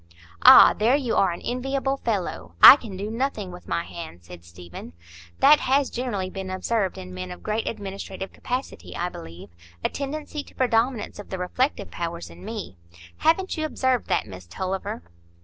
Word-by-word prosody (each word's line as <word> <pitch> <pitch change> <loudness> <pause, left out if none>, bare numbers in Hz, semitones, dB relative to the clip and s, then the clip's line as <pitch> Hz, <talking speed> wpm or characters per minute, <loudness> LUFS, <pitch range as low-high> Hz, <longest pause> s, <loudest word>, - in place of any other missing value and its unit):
"Ah, - - +9
there 230 +5 +2
you 260 -5 -1
are 195 - +3
an 170 - -7
enviable 270 +2 -2
fellow. 175 - -3
I - - +12
can 220 -9 -9
do 205 +3 -4
nothing 225 -6 -2
with 180 0 -12
my 170 - -1
hands," 125 - -10
said 85 0 -12
Stephen. 85 -1 -11 0.5
"That 295 +2 +7
has 275 +1 +1
generally 205 -7 -3
been 190 -1 -6
observed 190 +1 -1
in 90 0 -9
men 90 0 -6
of 90 -1 -10
great 220 +1 -2
administrative 195 -2 -6
capacity, 255 +2 -5
I 175 - -2
believe,—a 85 - -8
tendency 295 +2 -5
to - - -18
predominance 240 -2 0
of 205 - -10
the 190 - -4
reflective 250 +10 -1
powers 165 - -5
in 85 +2 -14
me! 90 0 -7 0.4
Haven't 370 +4 +1
you 315 - -2
observed 260 -4 0
that, - - 0
Miss 90 -4 -11
Tulliver?" 185 - -4
195 Hz, 170 wpm, -24 LUFS, -, 0.5 s, I